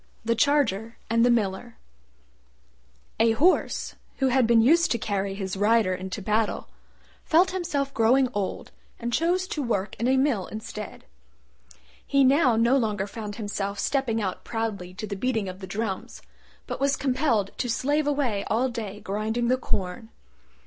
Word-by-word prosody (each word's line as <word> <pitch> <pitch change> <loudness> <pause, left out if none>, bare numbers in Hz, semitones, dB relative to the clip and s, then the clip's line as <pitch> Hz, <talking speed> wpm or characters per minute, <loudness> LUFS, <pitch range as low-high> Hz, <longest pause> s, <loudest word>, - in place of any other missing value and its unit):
THE 230 - +2
CHARGER 230 -4 +1
AND 230 0 +4
THE 245 - +5
MILLER 225 0 0 1.4
A 225 0 +4
Horse, 335 +11 +2 0.2
who 265 -1 +2
had 255 -2 +3
been 230 -1 +5
used 335 +7 +4
to 235 - +1
carry 200 -3 -2
his 195 -1 -4
rider 210 -1 +3
into 190 +2 -5
battle, 215 +2 0 0.5
felt 355 +4 +4
himself 285 -7 -2
growing 255 +3 +4
old 200 -2 -3 0.3
and 235 0 -4
chose 355 +5 +1
to 315 -9 -2
work 205 -6 -1
in 235 - +1
a 265 +1 +3
mill 260 -9 +1
instead. 215 -1 -8 1.0
He 275 0 +3
now 265 -2 +4
no 235 +4 +4
longer 210 -6 0
found 205 0 -7
himself 205 -2 -3
stepping 245 0 0
out 190 -4 -3
proudly 205 -6 -4
to 215 - -5
the 205 - -5
beating 220 -1 -1
of 185 0 -7
the 190 - -8
drums, 205 -2 -4 0.4
but - - -5
was 280 0 +3
compelled 250 -7 0
to 245 - -1
slave 290 +5 +1
away 265 -9 0
all 245 +4 +1
day 215 -4 -6
grinding 220 +4 -1
the 255 - +4
corn. 195 -2 -3
230 Hz, 160 wpm, -26 LUFS, 205-265 Hz, 1.4 s, THE